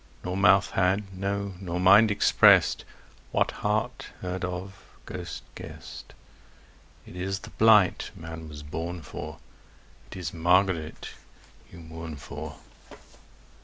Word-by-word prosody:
Nor 90 +1 -3
mouth 95 0 +4
had, 95 +1 0
no 100 +1 -2
nor 90 -2 -3
mind, 100 +4 +7
expressed 105 - +5 0.5
What - - +1
heart 110 +4 -1
heard 90 0 -4
of, 90 +2 -4 0.3
ghost 90 -1 -7
guessed: - - -10 0.9
It - - -12
is 95 +2 -2
the 105 - -10
blight 110 -4 +4
man 80 -1 -8
was 75 -1 -9
born 80 +3 -5
for, - - -7 0.7
It - - -9
is 85 -4 -5
Margaret 90 -1 +1 0.6
you - - -12
mourn 80 0 -8
for. 70 - -8
90 Hz, 120 wpm, -27 LUFS, 85-100 Hz, 0.9 s, mind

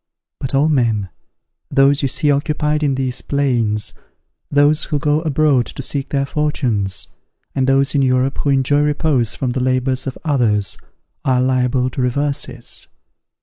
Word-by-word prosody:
But 135 +1 -3
all 140 +3 +3
men, 115 -9 +1 0.6
those 140 0 +3
you 140 - +1
see 145 +3 +1
occupied 150 +1 0
in 140 -3 +1
these 130 -1 -2
plains, 120 -7 0 0.6
those 145 +2 +3
who 150 - -1
go 150 +2 +1
abroad 150 -5 +2
to 135 - -7
seek 140 +1 -3
their 140 -1 0
fortunes, 125 -10 -1 0.4
and 135 -1 0
those 135 +1 +3
in 140 - +2
Europe 130 +1 +1
who 145 - 0
enjoy 135 +1 +2
repose 150 -5 +1
from 130 -2 -2
the 130 - -2
labours 130 +1 0
of 130 - -4
others, 115 - +1 0.5
are 130 -2 +2
liable 130 0 +1
to 130 - -3
reverses! 125 -1 -3
135 Hz, 150 wpm, -18 LUFS, 125-145 Hz, 0.6 s, all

